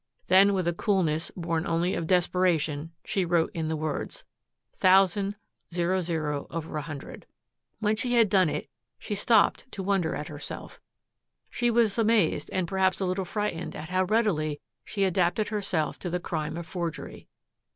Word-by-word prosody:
Then 195 +2 +6
with 185 -2 0
a 175 - +2
coolness 170 -5 0
born 165 0 -1
only 170 +1 +1
of 165 - -2
desperation 170 -4 +1
she 195 - 0
wrote 170 -1 +1
in 160 -1 -2
the 160 - -1
words, 155 -1 -4 0.5
"Thousand 195 +2 +4 0.4
00/100." 160 -3 -3 0.5
When 215 +1 +1
she 245 +2 0
had 230 -2 +6
done 185 -4 +4
it - - -3 0.3
she 215 - -5
stopped 225 +4 +3
to 195 - -5
wonder 185 -4 +1
at 150 - -5
herself. 145 -1 -8 0.7
She 240 -1 +1
was 230 -2 +2
amazed 215 -9 +2
and 185 -2 -1
perhaps 190 0 +1
a 195 - 0
little 185 +1 -1
frightened 180 -3 -3
at 155 - -7
how 185 +1 +1
readily 180 -9 +1 0.2
she 200 - -2
adapted 185 +2 +1
herself 190 -8 -1
to 180 - -4
the 180 +1 -1
crime 160 -2 -3
of 170 - -5
forgery. 170 -1 -5
180 Hz, 150 wpm, -27 LUFS, 160-200 Hz, 0.7 s, Then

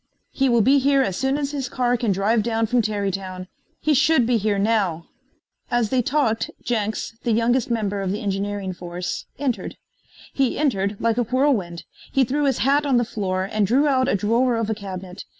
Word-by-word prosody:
"He 270 -1 +1
will 235 -1 +4
be 275 +4 +5
here 275 0 +3
as 190 -8 -2
soon 265 +6 0
as 285 -1 -2
his 275 -4 -3
car 245 -1 +1
can 235 -3 0
drive 205 +4 +2
down 225 0 0
from 240 +2 +2
Tarrytown. 195 -3 -3 0.3
He 310 - +1
should 290 -2 +4
be 240 0 +2
here 210 -1 0
now." 195 -6 0 0.6
As 240 -3 0
they 260 -1 +3
talked 240 -4 0
Jenks, 220 -1 -2
the 240 - -1
youngest 235 +2 +1
member 205 -4 -1
of 190 -1 -2
the 205 - -2
engineering 200 -1 -2
force, 175 0 -5
entered. 265 -5 -3 0.6
He 270 -3 0
entered 205 -9 0
like 230 +1 +1
a - - +3
whirlwind. 225 - 0 0.3
He 270 - +3
threw 285 +4 0
his 270 -3 +1
hat 285 +2 +3
on 275 -4 +2
the 240 - +2
floor 185 -5 -2
and 210 -2 +1
drew 275 +7 +3
out 260 -2 +2
a - - +2
drawer 230 +5 +2
of 225 -1 -1
a - - +2
cabinet. 190 -2 -8
230 Hz, 200 wpm, -22 LUFS, 200-260 Hz, 0.6 s, be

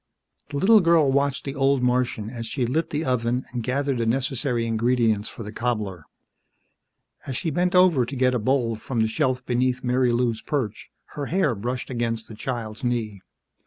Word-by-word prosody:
The 145 - -4
little 215 +8 +6
girl 165 -6 +4
watched 140 0 0
the 135 - -3
old 135 -1 +2
Martian 125 -3 0
as 115 -2 -6
she 125 +1 -1
lit 155 +7 -1
the 150 +2 -2
oven 125 0 0
and 120 - -2
gathered 135 +2 -1
the 115 - 0
necessary 125 0 0
ingredients 115 -2 +1
for 115 - -8
the 105 - -7
cobbler. 105 -8 -3 1.2
As 130 -3 -2
she 160 - -2
bent 180 +4 +1
over 180 -8 +5
to 140 - -6
get 130 0 +2
a 125 - +1
bowl 120 0 +1
from 115 +1 -2
the 110 - +3
shelf 130 +1 -1
beneath 125 +1 0
Marilou's 125 -2 +1
perch, 120 -8 -3 0.2
her 145 -2 -4
hair 170 -7 +1
brushed 125 +5 -4
against 115 -2 -2
the - - -10
child's 115 0 -5
knee. 115 -5 -2
125 Hz, 180 wpm, -24 LUFS, 115-135 Hz, 1.2 s, little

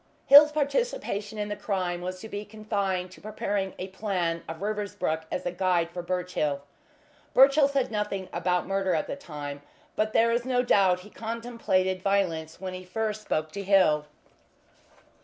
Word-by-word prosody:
Hill's 295 +2 +9
participation 285 - -1
in 210 0 -2
the 205 - -3
crime 185 -4 -2
was 185 +1 -5
to 220 - -7
be 205 -1 -5
confined 200 -4 -2
to - - -14
preparing 200 -2 -2
a 185 - -5
plan 185 -4 -1
of 165 0 -6
Riversbrook 200 -6 -2
as 180 - -3
a 175 - 0
guide 175 -2 +1
for 175 - -5
Birchill. 175 -5 -2 0.7
Birchill 275 +2 +7
said 275 -4 0
nothing 210 -3 -2
about 180 +1 0
murder 195 -2 0
at 155 - 0
this 280 - -7
time, 145 -2 -6 0.3
but 215 0 0
there 230 +1 +4
is 235 +1 +1
no 250 -1 +1
doubt 190 -6 +3
he 210 +3 -14
contemplated 225 -5 -1
violence 180 -6 0
when 185 0 -5
he 185 0 -7
first 215 +3 -3
spoke 155 -6 -2
to 200 - -5
Hill. 185 -7 +3
195 Hz, 165 wpm, -27 LUFS, 180-215 Hz, 0.7 s, Hill's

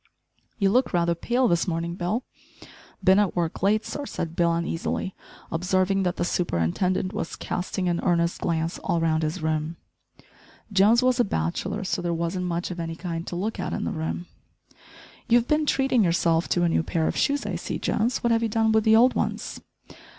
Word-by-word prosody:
"You 195 -2 +2
look 250 +1 +2
rather 170 -1 +2
pale 240 +9 +1
this 170 -2 +1
morning, 170 0 -2
Bill?" 185 +8 -2 0.8
"Bin 190 +1 +6
at 205 -3 +1
work 170 -2 -2
late, 210 +3 +2
sir," 290 -1 -5
said 165 -1 -4
Bill 170 -1 +3
uneasily, 170 +2 -2 0.4
observing 185 +3 +1
that 180 -2 0
the 175 - -1
superintendent 180 - 0
was 205 -6 -4
casting 180 0 -3
an 175 -1 0
earnest 170 -2 +1
glance 165 0 -1
all 170 -3 0
round 160 -1 +1
his 155 0 -2
room. 155 +1 -1 1.0
Jones 210 +5 +5
was 255 0 +2
a - - +6
bachelor, 85 - -2
so 185 - -1
there 170 -1 -1
wasn't 170 +2 -2
much 175 +1 -2
of 175 - -6
any 165 -1 -4
kind 170 -1 -5
to - - -4
look 210 +5 -3
at - - -3
in - - -2
the - - -2
room. 160 0 -3 1.0
"You've 240 +1 +4
been 300 0 +1
treating 265 -5 +3
yourself 170 -1 +2
to 175 - +2
a 170 - +3
new 165 - +2
pair 160 0 -1
of - - -1
shoes, 285 0 +1
I - - -2
see, - - -4
Jones, 235 +4 0
what 235 - +2
have 230 0 +3
you 230 - 0
done 220 +1 +2
with 220 -1 +3
the 220 0 +6
old 245 +3 +6
ones?" - - -3
180 Hz, 195 wpm, -25 LUFS, 170-215 Hz, 1.0 s, Bin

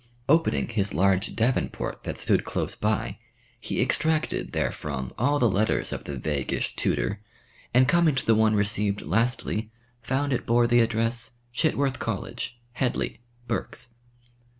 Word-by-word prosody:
Opening 165 +3 +3
his 100 -6 -1
large 95 +3 +2
Davenport 115 +3 -1
that - - -4
stood - - +2
close - - -2
by, 105 -1 -1 0.4
he 110 - -3
extracted 155 +5 +1
therefrom 65 -4 -3
all 145 +5 +3
the 125 - +4
letters 105 +1 +1
of - - -6
the 70 - -4
vaguish 70 0 -2
tutor, 60 - 0 0.5
and 125 +1 +5
coming 170 -2 +4
to 130 - -1
the 115 - +5
one 110 0 +4
received 105 0 +1
lastly, 110 - 0 0.3
found 135 +4 0
it 125 - -2
bore 120 +1 +4
the 120 +1 +4
address, 115 +1 0 0.2
"Chitworth 140 -2 +1
College, 120 - -4 0.2
Hedley, 125 -1 -1 0.3
Berks." 115 0 -3
115 Hz, 140 wpm, -26 LUFS, 105-130 Hz, 0.5 s, and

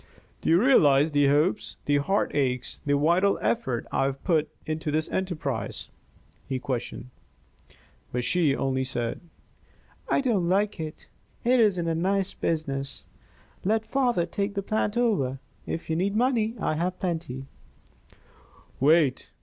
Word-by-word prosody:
"Do - - -1
you 165 +2 +6
realize 155 - +5
the 145 -1 +3
hopes, 150 +9 +1
the 145 0 +3
heartaches, 140 -6 0
the 145 0 +3
vital 175 +7 +3
effort 115 +2 -1
I 135 - +1
have 135 0 -3
put 160 -4 +1 0.2
into 155 -1 -3
this 155 +1 0
enterprise?" 155 - -3 0.6
he 130 - -1
questioned. 125 -1 -4 1.0
But 125 0 -1
she 155 -2 +2
only 130 -1 0
said: 120 -3 -2 0.9
"I - - +3
don't 210 -10 +1
like 200 +1 +1
it. 155 -1 -7 0.4
It 250 +1 +4
isn't 190 -6 +3
a 165 - +1
nice 190 +3 0
business. 140 -4 -3 0.6
Let 220 +3 +1
father 240 -6 +1
take 200 +4 -3
the 200 - -1
plant 215 +2 -1
over. 195 - +1 0.3
If 165 - -4
you 160 - -1
need 195 +4 0
money, 235 -2 +1
I 155 - 0
have 180 +2 -2
plenty 160 -8 -3 0.7
" - - -29
"Wait!" 150 -1 +3
165 Hz, 140 wpm, -26 LUFS, 140-200 Hz, 1.0 s, you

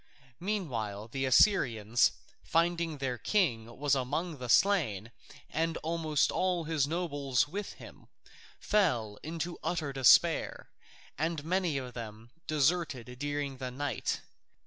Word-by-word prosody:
Meanwhile 115 - -3
the 135 +2 -2
Assyrians, 120 - +4 0.3
finding 170 0 +1
that 145 - -10
their 125 -2 -1
king 130 - +1
was 145 0 +1
among 140 +4 -1
the 125 -1 -6
slain 120 - +3 0.4
and 165 +1 -1
almost 160 -2 +1
all 180 -2 0
his 155 -3 0
nobles 145 -6 0
with 200 +7 -5
him, - - -14 0.5
fell 120 - +1
into 165 +2 -5
utter 155 -5 -2
despair, 135 -3 +4 0.5
and 160 -1 -1
many 175 -3 0
of 125 -2 -5
them 115 0 -8 0.2
deserted 145 -5 0
during 145 -1 -3
the 130 -1 -4
night. 140 +2 -2
145 Hz, 125 wpm, -31 LUFS, 125-170 Hz, 0.5 s, Assyrians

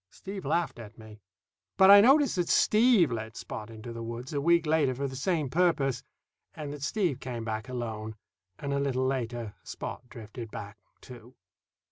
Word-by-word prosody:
Steve 195 - -8
laughed 170 -7 -1
at 110 -1 -11
me. 110 -1 -13 0.6
But 190 +1 +8
I 200 0 +10
notice 275 +5 +5
that 175 -3 -1
Steve 215 - +4
led 110 -1 -5
Spot 105 +1 -7
into 115 +1 -9
the 115 - -7
woods, 115 +4 -6
a 140 - -1
week 170 +2 +3
later, 150 -4 +2
for 140 +2 -2
the 130 - -7
same 155 +2 0
purpose, 140 -4 +1 0.5
and 150 -2 -6
that 145 - -9
Steve 165 - -1
came 120 -4 -5
back 110 +2 -4
alone, 110 -3 -5 0.4
and 140 -1 -4
a 140 - 0
little 130 -2 0
later 120 -4 -3
Spot - - -6
drifted 115 0 -9
back, 105 +1 -9 0.2
too. 125 0 -13
130 Hz, 175 wpm, -29 LUFS, 115-165 Hz, 0.6 s, I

